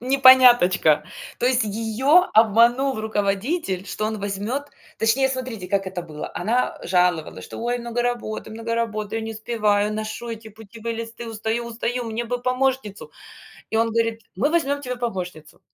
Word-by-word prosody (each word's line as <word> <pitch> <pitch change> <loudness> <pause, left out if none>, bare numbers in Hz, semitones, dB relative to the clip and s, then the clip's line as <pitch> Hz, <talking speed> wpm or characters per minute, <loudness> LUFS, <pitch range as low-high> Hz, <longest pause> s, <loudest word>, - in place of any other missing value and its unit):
непоняточка. 250 - +6 0.3
То 245 - +1
есть 255 -2 +3
её 230 - +3
обманул 235 +4 +4
руководитель, 205 - -1
что 215 - -3
он 220 0 -2
возьмёт, 205 +7 -3 0.4
точнее, 240 +5 +3
смотрите, 255 -7 -4
как 195 0 0
это 185 -2 -4
было. 155 -3 -7
Она 240 +4 0
жаловалась, 175 - +1
что: - - -9
"Ой, 240 +1 -1
много 235 0 -2
работы, 240 -3 -3
много 230 +1 -4
работы, 215 -3 -2
я - - -1
не 225 - -4
успеваю, 215 -2 0
ношу 215 +2 -5
эти 225 -1 -7
путевые 220 +2 -7
листы, 230 +1 -7
устаю, 225 +2 -2
устаю, 235 +1 -3
мне 230 +1 -3
бы 245 +1 -2
помощницу". 255 -4 -1 0.6
И - - +3
он 230 +1 +3
говорит: 230 0 0 0.2
"Мы 280 +8 +2
возьмём 285 -4 +1
тебе 250 -2 -4
помощницу". 180 -10 -5
225 Hz, 155 wpm, -23 LUFS, 210-245 Hz, 0.6 s, непоняточка